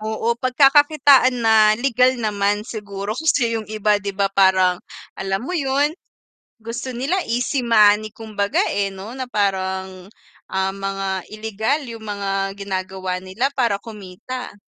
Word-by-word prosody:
Oo. 220 +2 -1
Pagkakakitaan 275 0 +5
na 225 0 +5 0.2
legal 255 +1 +2
naman 205 -2 -1
siguro, 205 -3 -5
kasi 250 -2 +1
yung 215 - -9
iba 210 -1 +1
'di 200 0 -5
ba 195 -1 0
parang 190 -2 +3 0.4
alam 195 +2 -2
mo 360 - -5
yun, 285 -1 +1 0.7
gusto 240 +3 -5
nila 270 +10 -1
easy 250 +3 0
money 215 -2 +4
kumbaga, 210 -3 -2
eh, 200 -1 -1
no 195 +4 -9
na 260 - -3
parang, 190 -2 -2 0.4
ah, 190 0 -1
mga 195 0 -4 0.3
ilegal 220 +6 -2
yung 230 -1 -9
mga 195 -1 -2
ginagawa 190 -1 -4
nila 190 +9 -1
para 235 -7 +1
kumita. 215 +4 -8
215 Hz, 135 wpm, -21 LUFS, 195-250 Hz, 0.7 s, Pagkakakitaan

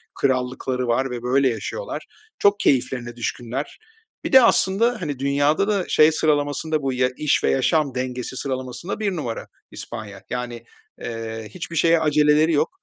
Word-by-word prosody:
krallıkları 130 -1 -1
var 130 +3 +1
ve 120 - -4
böyle 130 +2 +3
yaşıyorlar. - - -5 0.3
Çok 200 0 +4
keyiflerine 125 -5 0
düşkünler. 120 +3 -4 0.5
Bir - - -3
de, 265 - +9
aslında, 230 +1 +3
hani, 145 -3 -4
dünyada 145 +6 +2
da 200 -4 0
şey 155 +1 +5
sıralamasında 150 0 0
bu 135 -1 -1
y 125 0 +1
iş 150 -2 +1
ve - - +3
yaşam 140 0 +1
dengesi 125 0 -4
sıralamasında 130 - -4
1 205 -2 0
numara 125 -8 -4 0.2
İspanya, 105 -4 -8
yani, 120 -1 -4 0.4
eee, 115 -1 -5
hiçbir 165 - -7
şeye 165 0 +4
aceleleri 150 +1 +3
yok. 145 - +2
135 Hz, 150 wpm, -22 LUFS, 125-155 Hz, 0.5 s, de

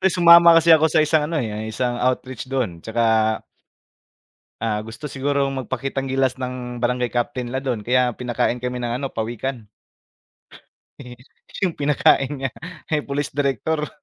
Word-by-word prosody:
Ay, 190 - +4
sumama 170 -1 +7
kasi 165 0 +6
ako 160 0 +5
sa 155 0 +3
isang 155 -1 +1
ano 165 - -2
eh, 120 - -1
yung 105 +1 -5
isang 120 +2 -2
outreach 130 0 -2
do'n, 115 -11 -2
tsaka 115 +3 -1 1.6
Ah, 110 -2 0
gusto 115 +7 -11
siguro 140 0 0
magpakitang 135 +1 -3
gilas 130 -1 0
ng, 125 -1 -5
barangay 125 0 0
Captain 125 0 -2
nila 130 - -2
do'n, 120 -5 -1
kaya 125 +1 +1
pinakain 125 0 -2
kami 125 0 -3
ng 120 -1 -3
ano, 135 +2 -3
pawikan. 115 +1 -4 1.3
Eh, 125 -2 -10 0.5
yung 180 - 0
pinakain 140 -2 +2
niya, 135 -1 -3 0.4
eh, 150 - +2
police 145 0 -4
director. 145 +3 -1
130 Hz, 155 wpm, -21 LUFS, 120-145 Hz, 1.6 s, sumama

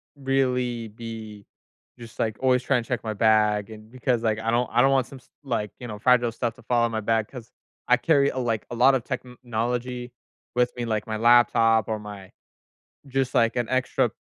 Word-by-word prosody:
really 125 -4 -1
be 110 -2 -9 0.5
just, 115 0 -12
like, 110 -2 0
always 130 -1 +2
trying 130 -3 +1
to - - -18
check 125 -2 -2
my 110 - -3
bag 105 -1 +2
and 110 0 -12
because, 125 -2 -1
like, 110 -1 0
I 110 +1 -2
don't 120 0 +1
I 120 - +4
don't 135 - +4
want 135 -2 +2
some 135 - -11
s - - -27
like, 115 -6 -2
you 120 - -7
know, 105 -2 -7
fragile 120 0 +3
stuff 115 0 -3
to - - -18
fall 120 -1 +1
out - - -1
my 110 - -2
bag 110 0 0
'cause 120 -4 -11 0.4
I 125 - +5
carry, 140 +1 +3
like, 120 -4 -2
a - - -4
lot 130 +3 +5
of 125 - -1
technology 125 -1 -4 0.4
with 125 0 +2
me, 120 - -2
like 110 -2 -2
my 110 -1 -3
laptop 115 -2 +4
or 110 -1 -2
my 100 -2 -10 0.8
just, 135 -1 -1
like, 115 0 +3
an 120 -2 -1
extra 130 0 +1
120 Hz, 205 wpm, -25 LUFS, 110-125 Hz, 0.8 s, I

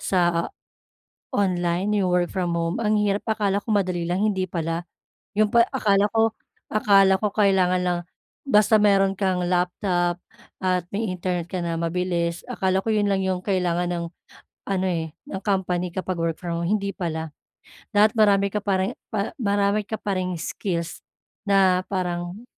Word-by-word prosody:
sa 175 -2 +1 0.9
online, 180 0 0
'yung 190 -2 +1
work 175 -1 +2
from 180 -3 -1
home, 165 +1 -1
ang 215 0 +2
hirap, 205 0 0
akala 205 -2 +1
ko - - -11
madali 180 -4 0
lang, 180 +2 0
hindi 190 -3 0
pala. 165 0 -3 0.5
'Yung 215 -1 +3
pa 235 - +7
akala 205 -6 +3
ko 225 0 +3 0.4
akala 195 -2 +5
ko 210 - +1
kailangan 190 -3 +3
lang, 175 -1 0 0.5
basta 215 -4 +5
meron 195 -2 +4
kang 185 -2 0
laptop 180 0 0 0.4
at 180 -2 0
may 210 -2 -1
internet 180 -1 -2
ka 185 -2 -2
na 170 -1 -2
mabilis, 170 0 -1
akala 190 -5 0
ko - - -2
'yon 210 -1 +2
lang 195 - +1
'yong 185 -1 -1
kailangan 180 -3 0
ng 170 -1 -3 0.6
ano 190 -1 0
eh, 160 -2 -3
ng 190 - -4
company 180 -3 0
kapag 185 -2 -3
work 165 -1 0
from 170 -2 -3
home, 170 - -1
hindi 200 -1 0
pala. 160 -3 -4 0.6
Dapat 210 +1 +5
marami 200 -2 +4
ka 210 - 0
pa 195 -2 +1
ring 190 - -2 0.2
pa 205 -1 -1
marami 200 0 +1
ka 220 - -3
pa 200 -2 -2
ring 180 -1 -2
skills 170 0 -4 0.5
na 190 -2 +4
parang 180 +2 -3
185 Hz, 165 wpm, -24 LUFS, 175-200 Hz, 0.9 s, pa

